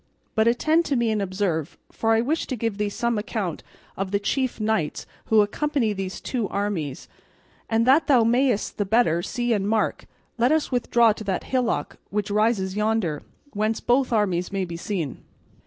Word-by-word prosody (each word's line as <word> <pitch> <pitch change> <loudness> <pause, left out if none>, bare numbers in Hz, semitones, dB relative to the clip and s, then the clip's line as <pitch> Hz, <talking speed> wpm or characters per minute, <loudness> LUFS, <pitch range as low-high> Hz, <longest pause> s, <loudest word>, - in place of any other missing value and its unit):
But 220 +1 +2
attend 310 +8 +3
to 280 - 0
me 235 -2 +1
and 215 -1 0
observe, 185 -5 -2
for 225 0 +1
I 225 - +3
wish 305 +7 -1
to 260 - -2
give 225 -3 -3
thee 210 -1 0
some 235 +1 -1
account 205 -6 -3 0.3
of 195 0 -3
the 200 - +1
chief 255 +5 -1
knights 215 -8 -1 0.2
who 220 -1 +5
accompany 240 +1 0
these 190 -1 -5
two 235 -6 -2
armies; 185 -10 -3 0.6
and 225 0 +2
that 275 +6 +4
thou 255 -6 +5
mayest 240 -2 +1
the 205 - +1
better 195 -5 +3
see 240 +5 -1
and 200 -1 0
mark, 220 0 0 0.3
let 245 +4 +4
us 315 -2 +1
withdraw 235 -2 +3
to 215 - -8
that 190 -2 -1
hillock 245 - -1
which 205 0 -2
rises 205 -3 +1
yonder, 210 -8 0 0.3
whence 215 +1 0
both 255 +1 +2
armies 185 -5 +1
may 195 -1 -1
be 170 -1 -7
seen." 170 - -4
215 Hz, 180 wpm, -24 LUFS, 195-240 Hz, 0.6 s, who